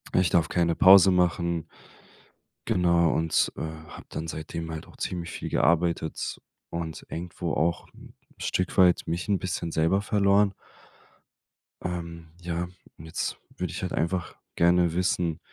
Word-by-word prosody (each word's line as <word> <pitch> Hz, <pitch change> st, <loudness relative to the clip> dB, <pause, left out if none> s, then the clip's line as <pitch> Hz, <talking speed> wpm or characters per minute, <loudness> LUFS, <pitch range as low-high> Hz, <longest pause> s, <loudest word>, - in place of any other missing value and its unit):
„ich 90 Hz, -2 st, +4 dB
darf 85 Hz, -2 st, +2 dB
keine 85 Hz, -1 st, +1 dB
Pause 95 Hz, +1 st, +8 dB
machen.“ 85 Hz, -2 st, +1 dB, 1.0 s
Genau, 85 Hz, -2 st, +3 dB
und, 80 Hz, 0 st, +1 dB
äh, -, -, -5 dB
habe 80 Hz, 0 st, -8 dB
dann 80 Hz, -, -5 dB
seitdem 80 Hz, +1 st, -5 dB
halt 80 Hz, -, -7 dB
auch -, -, -17 dB
ziemlich 85 Hz, -2 st, -4 dB
viel -, -, -5 dB
gearbeitet 85 Hz, -2 st, 0 dB, 0.3 s
und 80 Hz, -2 st, -5 dB
irgendwo 85 Hz, -1 st, -4 dB
auch 80 Hz, +3 st, 0 dB
'n -, -, -15 dB, 0.2 s
Stück 90 Hz, 0 st, -2 dB
weit 90 Hz, -2 st, +5 dB
mich 85 Hz, +2 st, -2 dB
'n 100 Hz, -2 st, +2 dB
bisschen 90 Hz, -3 st, -3 dB
selber 80 Hz, +5 st, +2 dB
verloren. 100 Hz, -1 st, +3 dB, 1.3 s
Ähm, 85 Hz, -1 st, -5 dB
ja, 85 Hz, 0 st, -3 dB, 0.3 s
jetzt 80 Hz, +1 st, -4 dB, 0.2 s
würde -, -, -3 dB
ich -, -, -5 dB
halt -, -, -3 dB
einfach 85 Hz, +3 st, -1 dB, 0.2 s
gerne 85 Hz, -1 st, +3 dB
wissen, 90 Hz, -2 st, 0 dB
85 Hz, 140 wpm, -27 LUFS, 80-90 Hz, 1.3 s, Pause